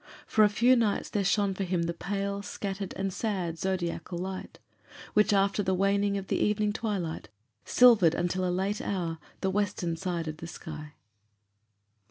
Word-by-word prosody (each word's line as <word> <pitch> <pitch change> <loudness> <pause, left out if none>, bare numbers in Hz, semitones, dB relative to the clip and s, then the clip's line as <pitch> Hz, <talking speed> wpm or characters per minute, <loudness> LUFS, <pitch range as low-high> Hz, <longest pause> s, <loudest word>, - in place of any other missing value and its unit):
For 215 - +4
a 210 - +6
few 240 +5 +4
nights 225 -4 0
there 205 - 0
shone 200 +1 +2
for 195 - -3
him 180 -2 0
the 170 0 -1
pale, 200 +3 -3
scattered, 195 -1 -5
and 195 -1 -2
sad 180 -7 -2
zodiacal 175 -2 -2
light, 185 +1 -5 0.6
which, 210 0 +4
after 200 +1 +3
the 190 -1 +1
waning 200 +1 +2
of 195 - -4
the - - -1
evening 210 0 +1
twilight, 190 - -3 0.4
silvered 220 -10 +6
until 175 +1 -1
a 180 - +1
late 190 +4 -1
hour 170 -4 -2 0.2
the 190 - +1
western 190 -4 -1
side 170 -1 -3
of 155 0 -4
the 165 - -7
sky. 155 -3 -8
190 Hz, 170 wpm, -29 LUFS, 175-205 Hz, 0.6 s, a